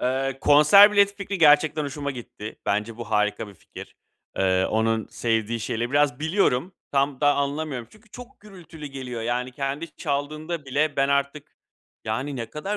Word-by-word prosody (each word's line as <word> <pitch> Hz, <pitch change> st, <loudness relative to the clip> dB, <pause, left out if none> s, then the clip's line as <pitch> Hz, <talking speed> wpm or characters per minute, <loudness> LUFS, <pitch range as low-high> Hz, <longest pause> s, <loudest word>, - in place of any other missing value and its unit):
Eee, 135 Hz, +1 st, -1 dB
konser 150 Hz, +9 st, +7 dB
bileti 200 Hz, -1 st, +4 dB
fikri 200 Hz, -1 st, -5 dB
gerçekten 150 Hz, -1 st, +4 dB
hoşuma 140 Hz, 0 st, -4 dB
gitti. 115 Hz, -4 st, -9 dB
Bence 105 Hz, +2 st, -1 dB
bu 115 Hz, -2 st, -8 dB
harika 105 Hz, 0 st, 0 dB
bir 100 Hz, -, -14 dB
fikir. -, -, -12 dB, 0.4 s
Eee, 95 Hz, 0 st, +2 dB
onun 110 Hz, 0 st, 0 dB
sevdiği 115 Hz, 0 st, -2 dB
şeyleri 120 Hz, +2 st, -3 dB
biraz 145 Hz, -2 st, +1 dB
biliyorum. 160 Hz, -1 st, +1 dB, 0.2 s
Tam 140 Hz, -1 st, 0 dB
da 145 Hz, -1 st, +4 dB
anlamıyorum 140 Hz, -3 st, -3 dB
çünkü 215 Hz, 0 st, -22 dB
çok 245 Hz, +3 st, -12 dB
gürültülü 170 Hz, -7 st, -11 dB
geliyor 130 Hz, -4 st, -6 dB
yani 125 Hz, +2 st, -2 dB
kendi 140 Hz, +4 st, -5 dB
çaldığında 150 Hz, +3 st, -3 dB
bile 145 Hz, +3 st, -1 dB
ben 135 Hz, 0 st, +2 dB
artık 140 Hz, +1 st, -2 dB, 0.5 s
yani, 130 Hz, +6 st, -3 dB
ne 115 Hz, -2 st, -6 dB
kadar 195 Hz, +7 st, -4 dB
140 Hz, 160 wpm, -24 LUFS, 120-155 Hz, 0.5 s, konser